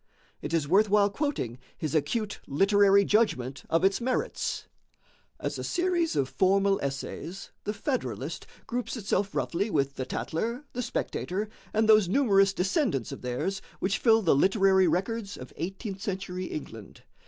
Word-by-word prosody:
It 145 Hz, -, -5 dB
is 165 Hz, -4 st, +1 dB
worth 200 Hz, +6 st, +4 dB
while 205 Hz, 0 st, +4 dB
quoting 200 Hz, -, -2 dB, 0.2 s
his 155 Hz, -3 st, -3 dB
acute 210 Hz, +7 st, -1 dB
literary 200 Hz, +5 st, +4 dB
judgment 135 Hz, -, +1 dB
of 165 Hz, -, +2 dB
its 195 Hz, +4 st, +3 dB
merits: 260 Hz, -, -1 dB, 0.7 s
"As -, -, -3 dB
a -, -, -4 dB
series 350 Hz, -2 st, 0 dB
of 135 Hz, -2 st, +1 dB
formal 195 Hz, +4 st, +2 dB
essays, 140 Hz, +7 st, -5 dB
the 210 Hz, -, 0 dB
'Federalist' 260 Hz, +4 st, -3 dB, 0.2 s
groups 245 Hz, 0 st, -3 dB
itself 200 Hz, -3 st, -1 dB
roughly 170 Hz, -, -1 dB
with 140 Hz, -6 st, 0 dB
the 130 Hz, -, -2 dB
'Tatler,' 235 Hz, -, -3 dB
the 250 Hz, -, -2 dB
'Spectator,' 210 Hz, -3 st, -3 dB, 0.2 s
and 220 Hz, 0 st, +2 dB
those 215 Hz, -4 st, +6 dB
numerous 195 Hz, -5 st, +4 dB
descendants 190 Hz, -, 0 dB
of -, -, -7 dB
theirs 125 Hz, +11 st, -2 dB, 0.2 s
which 195 Hz, +2 st, 0 dB
fill 225 Hz, -2 st, +4 dB
the 170 Hz, -, +4 dB
literary 190 Hz, +4 st, +4 dB
records 200 Hz, +5 st, -1 dB
of 130 Hz, -, -10 dB
eighteenth 195 Hz, +3 st, -5 dB
century 190 Hz, -2 st, -3 dB
England. 115 Hz, -, -8 dB
195 Hz, 150 wpm, -28 LUFS, 165-220 Hz, 0.7 s, those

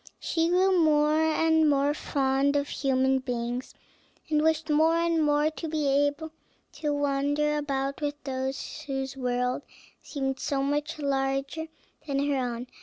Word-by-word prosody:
She 330 Hz, 0 st, 0 dB
grew 365 Hz, 0 st, +3 dB
more 305 Hz, 0 st, +3 dB
and 320 Hz, 0 st, +3 dB
more 285 Hz, 0 st, +2 dB
fond 275 Hz, -1 st, 0 dB
of 285 Hz, 0 st, 0 dB
human 265 Hz, -1 st, +1 dB
beings, 245 Hz, -1 st, -4 dB, 0.6 s
and 300 Hz, -1 st, +3 dB
wished 320 Hz, 0 st, +1 dB
more 315 Hz, +2 st, +3 dB
and 335 Hz, -1 st, +2 dB
more 295 Hz, +1 st, +2 dB
to 325 Hz, +1 st, -6 dB
be 305 Hz, -1 st, -1 dB
able 290 Hz, +3 st, +1 dB, 0.4 s
to 300 Hz, -2 st, -3 dB
wander 290 Hz, +1 st, 0 dB
about 275 Hz, -1 st, -2 dB
with 290 Hz, -1 st, -1 dB
those 265 Hz, +3 st, -4 dB
whose 270 Hz, -1 st, -3 dB
world 250 Hz, 0 st, -1 dB, 0.4 s
seemed 270 Hz, -2 st, -3 dB
to -, -, -11 dB
be -, -, -6 dB
so 275 Hz, -1 st, 0 dB
much 290 Hz, +2 st, -1 dB
larger 275 Hz, +2 st, -1 dB, 0.4 s
than 280 Hz, -1 st, -1 dB
her -, -, +1 dB
own. 245 Hz, -1 st, -3 dB
285 Hz, 155 wpm, -27 LUFS, 270-310 Hz, 0.6 s, grew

